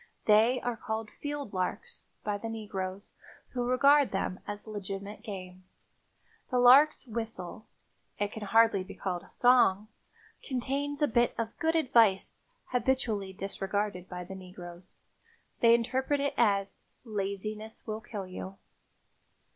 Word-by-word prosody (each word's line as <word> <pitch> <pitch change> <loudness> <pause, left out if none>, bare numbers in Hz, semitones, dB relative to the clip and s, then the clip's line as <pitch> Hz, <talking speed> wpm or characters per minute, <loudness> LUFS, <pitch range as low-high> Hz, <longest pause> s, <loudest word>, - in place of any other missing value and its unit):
They 225 +4 +5
are 245 -1 -2
called 220 -1 -4
"field 290 -6 -5
larks" 190 - -3 0.2
by 205 -1 -2
the 225 - -5
negroes, 200 -3 -5 0.4
who 245 -1 -2
regard 280 +2 +5
them 190 -1 -2
as 205 0 -6
legitimate 200 -1 -6
game. 185 -3 -8 0.9
The 255 - +1
lark's 265 +6 +7
whistle—it 215 -2 -7
can 220 - -7
hardly 225 -1 +4
be - - -10
called 180 -3 -3
a - - -18
song—contains 255 +5 0
a - - +5
bit 240 0 +2
of 230 -1 -3
good 325 -1 +1
advice 230 -10 +3 0.3
habitually 240 -6 0
disregarded 195 0 -3
by 180 -1 -5
the 185 - -8
negroes. 180 -2 -11 0.6
They 230 0 +7
interpret 260 +4 0
it 280 0 0
as 200 -4 +1 0.3
"laziness 215 +1 -4
will 215 0 -4
kill 205 -3 -6
you." 185 +1 -8
215 Hz, 125 wpm, -30 LUFS, 195-245 Hz, 0.9 s, lark's